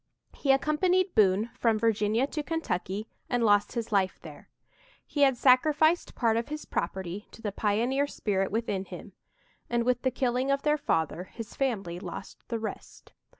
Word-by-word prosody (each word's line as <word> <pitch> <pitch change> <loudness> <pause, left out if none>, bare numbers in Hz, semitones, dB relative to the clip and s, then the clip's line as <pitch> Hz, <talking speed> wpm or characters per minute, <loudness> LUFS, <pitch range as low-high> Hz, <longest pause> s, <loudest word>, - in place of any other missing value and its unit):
He 275 - +1
accompanied 355 +7 +2
Boone 210 +2 +3
from 225 -2 +1
Virginia 220 +2 +2
to 300 +2 -4
Kentucky 215 - -3 0.2
and 245 -1 +1
lost 205 -1 +3
his 235 -2 -3
life 195 -2 +1
there. - - -12 0.6
He 290 - -3
had 270 -3 +5
sacrificed 305 +6 +4
part 230 -2 +2
of 230 - -1
his 300 +1 -6
property 190 +2 -4
to - - -15
the 215 -2 -3
pioneer 235 +8 +1
spirit 195 -7 -1
within 205 -3 -2
him, - - -10 0.6
and, 235 0 +1
with 245 0 +1
the 260 - +2
killing 255 +1 0
of 275 0 +1
their 300 0 +2
father, 165 - -1
his 225 +3 -9
family 200 -10 -2
lost - - -9
the 230 - -2
rest. 220 -1 -8
235 Hz, 165 wpm, -28 LUFS, 205-275 Hz, 0.6 s, had